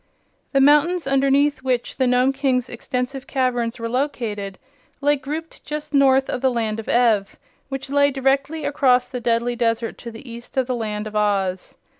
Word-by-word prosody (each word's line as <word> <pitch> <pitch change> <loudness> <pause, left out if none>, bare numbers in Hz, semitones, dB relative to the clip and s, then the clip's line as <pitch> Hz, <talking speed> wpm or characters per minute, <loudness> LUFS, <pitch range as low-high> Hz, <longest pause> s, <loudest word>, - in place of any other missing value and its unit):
The 275 - +3
mountains 300 +5 +4
underneath 275 +1 +2
which 255 -2 -2
the 260 - +2
Nome 250 +2 +3
King's 265 -3 0
extensive 250 +2 -4
caverns 245 -3 -1
were 230 -1 -4
located 230 -6 -3 0.4
lay 290 +1 +3
grouped 300 +4 -7
just 300 0 -6
north 270 -1 +4
of 250 - -3
the 265 - +3
Land 225 -3 -2
of 220 - -7
Ev, 225 -5 +2 0.3
which 270 0 -5
lay 285 0 +4
directly 275 +3 0
across 260 -3 +3
the 250 -2 -6
deadly 235 +1 0
desert 230 -1 -1
to 235 - -7
the 230 +4 -11
east 235 +2 -10
of 260 - +3
the 255 - -2
Land 215 -2 -3
of 215 0 -7
Oz. 195 -3 0
255 Hz, 175 wpm, -22 LUFS, 230-275 Hz, 0.4 s, mountains